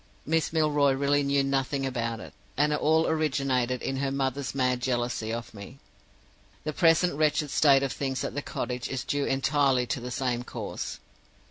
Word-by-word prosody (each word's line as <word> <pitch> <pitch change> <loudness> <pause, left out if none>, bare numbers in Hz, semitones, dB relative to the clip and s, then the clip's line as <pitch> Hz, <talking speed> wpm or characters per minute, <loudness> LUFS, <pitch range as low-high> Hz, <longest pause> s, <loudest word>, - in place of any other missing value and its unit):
Miss 160 +1 +1
Milroy 150 -3 +3
really 140 +1 +2
knew 140 0 +2
nothing 135 0 0
about 115 -3 -2
it, - - -10 0.2
and 150 +2 +3
it 150 - 0
all 160 +1 +3
originated 135 -5 0
in 135 - -2
her 135 0 0
mother's 135 0 -2
mad 125 -2 +1
jealousy 120 -3 -1
of 115 0 -5
me. 105 +5 -10 0.9
The 155 - -3
present 170 +1 +4
wretched 150 0 +1
state 140 -2 +5
of 135 - -1
things 135 -2 -2
at - - -3
the 145 - -2
cottage 125 -2 -4
is 130 -1 -3
due 145 -1 -1
entirely 135 -2 +2
to 135 - -2
the 125 +1 -6
same 125 -1 -1
cause. - - -6
135 Hz, 175 wpm, -27 LUFS, 125-145 Hz, 0.9 s, state